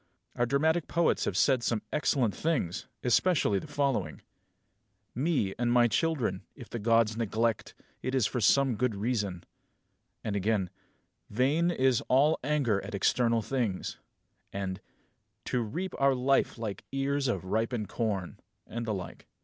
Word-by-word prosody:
Our 120 - +1
dramatic 160 +5 +1
poets 170 0 +1
have - - -1
said 130 -3 +3
some 115 -2 -1
excellent 130 -7 +1
things; 155 - -1 0.2
especially 125 - +3
the - - -9
following: 130 - -1 0.9
Me 130 - 0
and 120 -1 +1
my 120 0 +5
children, 150 +1 0
if - - -12
the 120 - -3
Gods 115 0 +3
neglect, 115 0 -1 0.3
It 130 +1 -2
is 130 -5 +3
for 120 +3 -1
some 135 -1 +3
good 125 -2 0
reason 100 -4 -2 0.8
and 105 - -2
again, 100 -2 0 0.6
Vain 140 +10 +2
is 130 -7 +2
all 140 +5 +4
anger 135 -8 +1
at - - -5
external 115 +3 +2
things; 115 -8 -2 0.5
and, 95 -1 -4 0.6
To 125 - 0
reap 170 - -4
our 135 -1 +4
life 130 +1 +1
like 110 -4 -5
ears 135 0 0
of 95 -7 -1
ripened 110 +2 -1
corn 100 -6 -3 0.3
and 115 0 -5
the 110 - 0
like. 90 -3 -8
120 Hz, 145 wpm, -29 LUFS, 105-135 Hz, 0.9 s, my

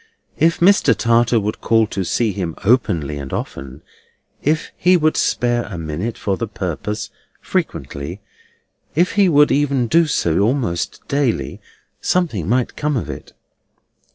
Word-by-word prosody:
If 165 +1 +3
Mr. 200 +3 +5
Tartar 115 0 +3
would 105 +1 -3
call 115 -1 +3
to 100 -2 -3
see 110 +5 0
him 90 -4 -4
openly 85 - +1
and 70 -1 -7
often; 65 +1 -6 0.6
if 155 +2 0
he 180 +1 +4
would 155 -1 +2
spare 120 -1 +1
a 90 - -7
minute 85 +8 -4
for 95 -2 -1
the 115 - -3
purpose, 100 +1 -4 0.3
frequently; 75 +7 -3 0.8
if 175 +4 +3
he 200 -3 +3
would 145 -2 +5
even 140 -3 +2
do 165 +7 +3
so, 85 - +1
almost 110 -5 -1
daily; 140 -4 -1 0.4
something 120 - 0
might 125 +1 0
come 150 -2 -1
of - - -3
it." - - -10
115 Hz, 145 wpm, -19 LUFS, 90-145 Hz, 0.8 s, Mr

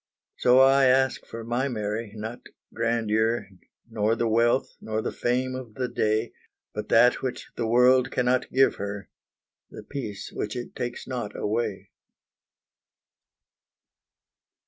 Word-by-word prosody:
So 125 0 +5
I 135 +1 +6
ask 130 +1 +2
for 115 0 -7
my 120 +4 -1
Mary, 105 -2 -3
not 110 +3 -6 0.3
grandeur, 115 -2 0 0.4
Nor 110 -1 0
the 115 0 0
wealth, 115 +3 +2
nor 110 0 -2
the - - -2
fame 130 +1 -1
of 130 -4 -8
the 130 -1 -1
day, 110 0 0 0.4
But - - -5
that 125 0 +5
which 130 -2 -5
the 115 - -2
world 125 +2 +4
cannot 125 0 +1
give 135 +1 +3
her, 100 -2 -5 0.6
The - - -10
peace 105 -8 -6
which 105 - -4
it 120 -1 -6
takes 120 0 -4
not 120 -5 -5
away. 110 -1 -2
120 Hz, 130 wpm, -26 LUFS, 110-125 Hz, 0.6 s, I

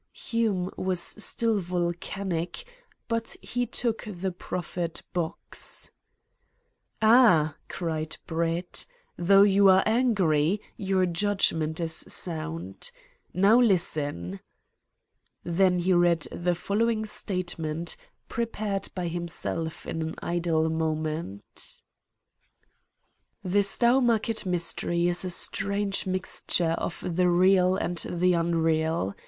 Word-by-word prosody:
Hume 210 -6 -1
was 185 -1 0
still 215 +3 +1
volcanic, 175 - -3 0.4
but 230 -1 -2
he 245 0 -2
took 230 -1 -2
the 190 -1 -3
proffered 175 -1 -4
box. 170 -2 -3 1.1
"Ah," 215 - +6
cried 160 -3 -3
Brett, 170 +1 -2 0.3
"though 195 +3 +6
you 200 -1 +5
are 190 0 +6
angry, 205 -7 +2 0.2
your 190 -1 +1
judgment 170 -4 0
is 165 -1 -1
sound. 95 - -3 0.4
Now 200 +6 +5
listen!" 145 - 0 1.0
Then 180 +1 +2
he 180 +2 +2
read 175 -2 +4
the 175 0 0
following 220 +4 0
statement, 175 -6 -2 0.3
prepared 215 -4 -2
by 180 -2 -2
himself 165 -1 -3
in 165 - -3
an 160 0 -3
idle 170 -2 0
moment: 155 - -3 1.6
"The 190 +2 +2
Stowmarket 230 0 +2
Mystery 175 0 0
is 175 +1 0
a 185 - -2
strange 200 +2 -1
mixture 185 -2 -1
of - - -4
the 180 +1 +2
real 185 +1 +4
and 175 -2 -2
the 180 +1 +2
unreal. 165 - +1
180 Hz, 100 wpm, -27 LUFS, 165-200 Hz, 1.6 s, Ah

